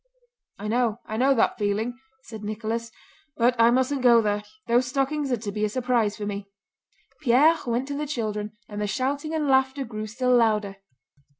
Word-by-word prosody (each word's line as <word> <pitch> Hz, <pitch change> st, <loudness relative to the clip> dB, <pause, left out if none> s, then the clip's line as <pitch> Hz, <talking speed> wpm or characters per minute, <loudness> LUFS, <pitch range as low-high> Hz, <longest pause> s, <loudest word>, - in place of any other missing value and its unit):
"I 210 Hz, -, -6 dB
know! 230 Hz, 0 st, +1 dB
I 215 Hz, -, -5 dB
know 265 Hz, +4 st, +3 dB
that 230 Hz, -, +1 dB
feeling," 215 Hz, +4 st, -1 dB, 0.2 s
said 220 Hz, -2 st, -9 dB
Nicholas. 225 Hz, +2 st, -3 dB, 0.5 s
"But 240 Hz, +1 st, +3 dB
I 230 Hz, 0 st, +7 dB
mustn't 260 Hz, +3 st, +1 dB
go 240 Hz, -2 st, +6 dB
there—those 235 Hz, -, -1 dB
stockings 275 Hz, +2 st, -1 dB
are 245 Hz, -, +2 dB
to 210 Hz, -2 st, -5 dB
be 210 Hz, +1 st, -3 dB
a 215 Hz, -, +2 dB
surprise 240 Hz, -3 st, 0 dB
for 210 Hz, -, -4 dB
me." 200 Hz, -1 st, -5 dB, 0.7 s
Pierre 295 Hz, +5 st, +5 dB
went 240 Hz, +3 st, -1 dB
to 285 Hz, -, -3 dB
the 300 Hz, +1 st, -3 dB
children, 215 Hz, -5 st, -3 dB
and 210 Hz, 0 st, -6 dB
the 210 Hz, -, 0 dB
shouting 280 Hz, +7 st, -2 dB
and 305 Hz, -2 st, 0 dB
laughter 265 Hz, 0 st, +2 dB
grew 215 Hz, -2 st, -6 dB
still 250 Hz, +3 st, +1 dB
louder. 210 Hz, -4 st, +2 dB
235 Hz, 180 wpm, -25 LUFS, 215-265 Hz, 0.7 s, I